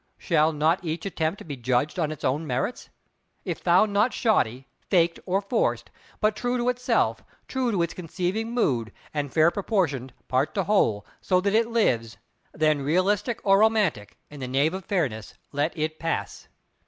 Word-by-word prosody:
Shall 155 +1 +2
not 160 +4 +1
each 160 +1 -4
attempt 165 -2 -2
be 145 - -4
judged 125 +7 0
on 155 -2 0
its 155 - -8
own 150 +5 0
merits? 130 - -2 0.6
If - - -3
found 185 +4 +3
not 210 +5 +3
shoddy, 130 - +1 0.2
faked, 170 -3 +3
or 190 +2 +1
forced, - - -1 0.3
but 215 0 +2
true 245 +3 -1
to 245 +1 +1
itself, 250 0 0 0.2
true 260 -2 -1
to 185 -5 +1
its 170 - -3
conceiving 185 +5 -3
mood, 125 - 0 0.2
and 145 -3 -2
fair 160 +1 +4
proportioned 175 - -1 0.2
part 130 +3 0
to 195 - +1
whole; 115 - +2 0.2
so 185 -1 +2
that 200 +1 0
it 225 +1 +3
lives—then, 155 - -1
realistic 190 - +1
or 195 0 +5
romantic, 210 - +1
in 145 - -10
the 130 - -4
name 140 +6 +1
of 190 -1 -6
Fairness 130 - -2 0.2
let 145 +3 0
it 155 0 -2
pass! 165 0 -3
170 Hz, 165 wpm, -25 LUFS, 145-205 Hz, 0.6 s, or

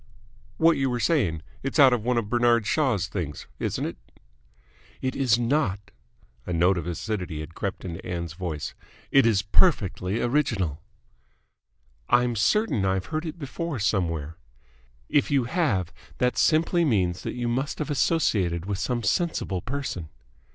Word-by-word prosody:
"What 165 0 +4
you 135 -1 +1
were 120 -1 -1
saying. 105 - +1 0.2
It's 135 - -3
out 135 -4 +7
of 120 -3 0
one 125 +1 +1
of 115 -3 0
Bernard 120 -1 +3
Shaw's 120 - +1
things, 85 -6 -5
isn't - - -2
it?" - - -5 1.0
"It 130 0 -2
is 125 -4 +3
not." 115 -6 0 0.6
A - - -2
note 90 +2 +3
of 85 - -6
acidity 90 -3 -3
had 75 +2 -9
crept 100 +1 -4
into 85 -2 -6
Ann's 85 -3 -4
voice. 85 -4 -4 0.4
"It 135 -3 +6
is 105 -3 +2
perfectly 100 - +2
original." 115 - 0 1.3
"I'm 120 -1 +3
certain 135 - +2
I've 95 -1 0
heard 155 +2 -1
it 160 - -6
before 160 +1 -4
somewhere." 85 -7 -1 0.7
"If 145 - +2
you 140 -3 +3
have, 115 - 0 0.2
that 125 0 +1
simply 165 +2 +3
means 95 - +1
that - - -4
you 120 -1 -2
must 130 +5 -1
have 150 -1 -3
associated 100 - +1
with 100 -1 -3
some 120 -2 -1
sensible 155 - 0
person." 120 - -4
115 Hz, 150 wpm, -26 LUFS, 90-135 Hz, 1.3 s, out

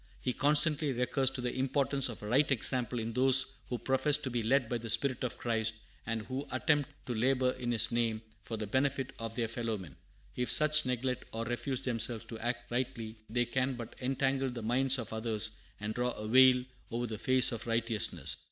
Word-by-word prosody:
He 125 - -2
constantly 150 +1 +4
recurs 125 +2 +1
to 135 -1 -5
the 125 0 -2
importance 135 0 0
of 115 - -8
a - - -5
right 135 +7 +3
example 125 -1 +2
in 115 0 -3
those 130 +1 +5 0.2
who 125 - -2
profess 135 +4 +2
to 145 -4 -5
be 120 -1 -1
led 125 +2 +2
by 120 0 -2
the 115 0 -7
spirit 130 +2 +1
of 125 - -3
Christ, 110 -1 -1 0.3
and 115 -1 -2
who 130 +5 -5
attempt 145 +2 +1 0.2
to 125 - -3
labor 125 +2 +2
in 120 -1 -4
His 115 - +4
name 115 -2 0 0.2
for 110 +3 -5
the 110 - -3
benefit 135 +3 -1
of 115 -1 -5
their 115 -2 -1
fellow 115 -1 -3
men. 85 -8 -11 0.4
If 125 0 -2
such 155 -2 +4
neglect 125 0 -2
or 115 +1 -3
refuse 120 +2 -3
themselves 115 -2 +1
to 115 - -7
act 120 +1 -4
rightly, 120 -3 -3
they 120 +2 +1
can 130 +2 -1
but 120 -2 -8
"entangle 135 +1 0
the 120 -2 -6
minds 130 +4 +2
of 115 -2 -6
others 110 -1 +1 0.3
and 105 +1 -3
draw 125 +1 -1
a 105 - -7
veil 130 +1 +6 0.3
over 120 +1 -2
the 110 -3 -5
face 130 +1 +4
of 115 -1 -6
righteousness." 115 -2 0
125 Hz, 205 wpm, -31 LUFS, 115-130 Hz, 0.4 s, veil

